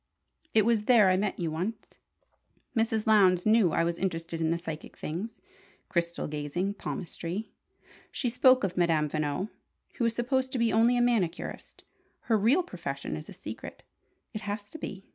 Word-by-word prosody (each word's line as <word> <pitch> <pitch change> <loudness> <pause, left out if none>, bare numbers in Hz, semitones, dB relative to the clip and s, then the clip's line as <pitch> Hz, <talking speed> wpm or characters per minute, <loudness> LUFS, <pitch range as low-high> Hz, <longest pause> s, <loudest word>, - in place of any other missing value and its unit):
It 215 -2 +5
was 225 -2 +2
there 215 -6 +6
I - - +4
met 195 +1 -1
you 165 -3 -2
once. 180 +8 -5 0.8
Mrs. 225 -1 +1
Lowndes 190 -5 +5
knew 215 -5 +5
I - - +2
was 170 0 -1
interested 165 -3 -2
in 160 - +2
the 165 - +1
psychic 160 -2 -7
things: 205 +9 -5 0.5
crystal 170 0 -1
gazing, 150 +6 -2
palmistry. 190 +1 -5 0.6
She 255 - -2
spoke 255 +1 +5
of 185 -2 -1
Madame 165 -4 +2
Veno, 150 +6 -2 0.5
who 240 - +1
is 230 -1 +1
supposed 260 +2 0
to - - 0
be 230 -1 +2
only 235 +2 +4
a - - +3
manicurist. 210 -8 -1 0.4
Her 230 - +1
real 260 - +4
profession 140 - -5
is 75 - -8
a - - -8
secret. - - -8 0.5
It 215 - -4
has 205 0 -5
to 320 - -8
be! 195 -7 -7
195 Hz, 170 wpm, -29 LUFS, 170-230 Hz, 0.8 s, there